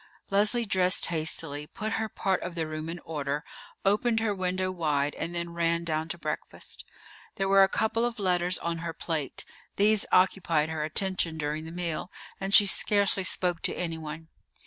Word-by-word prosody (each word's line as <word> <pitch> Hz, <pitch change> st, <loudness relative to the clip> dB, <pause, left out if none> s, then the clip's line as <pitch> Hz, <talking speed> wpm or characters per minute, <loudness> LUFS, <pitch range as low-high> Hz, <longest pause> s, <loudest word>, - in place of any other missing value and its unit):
Leslie 210 Hz, +4 st, +3 dB
dressed 185 Hz, -2 st, +3 dB
hastily, 155 Hz, -3 st, -2 dB
put 215 Hz, +4 st, -5 dB
her 220 Hz, 0 st, -1 dB
part 190 Hz, -2 st, 0 dB
of 180 Hz, -1 st, -5 dB
the 165 Hz, -2 st, -1 dB
room 155 Hz, +1 st, -5 dB
in 170 Hz, -, -4 dB
order, 145 Hz, -2 st, -2 dB, 0.4 s
opened 225 Hz, +3 st, +3 dB
her 220 Hz, -2 st, 0 dB
window 185 Hz, 0 st, -1 dB
wide, 150 Hz, -5 st, 0 dB
and 175 Hz, -, -4 dB
then 170 Hz, 0 st, -3 dB
ran 170 Hz, 0 st, +1 dB
down 160 Hz, -1 st, -1 dB
to 170 Hz, -, -3 dB
breakfast. -, -, -5 dB, 0.5 s
There 195 Hz, -, 0 dB
were 195 Hz, 0 st, +6 dB
a 195 Hz, -, +6 dB
couple 225 Hz, +3 st, +1 dB
of 240 Hz, 0 st, -1 dB
letters 180 Hz, -2 st, +1 dB
on 170 Hz, -1 st, -3 dB
her 165 Hz, 0 st, -4 dB
plate. 155 Hz, -6 st, -3 dB, 0.3 s
These 210 Hz, +1 st, +4 dB
occupied 175 Hz, -4 st, +3 dB
her 160 Hz, -1 st, -2 dB
attention 165 Hz, 0 st, 0 dB
during 155 Hz, +1 st, -2 dB
the 160 Hz, -, -7 dB
meal, 175 Hz, 0 st, -3 dB, 0.3 s
and 195 Hz, 0 st, -3 dB
she 205 Hz, 0 st, +8 dB
scarcely 200 Hz, 0 st, +3 dB
spoke 180 Hz, -2 st, +1 dB
to -, -, -1 dB
anyone. 160 Hz, -2 st, -5 dB
175 Hz, 175 wpm, -28 LUFS, 160-195 Hz, 0.5 s, she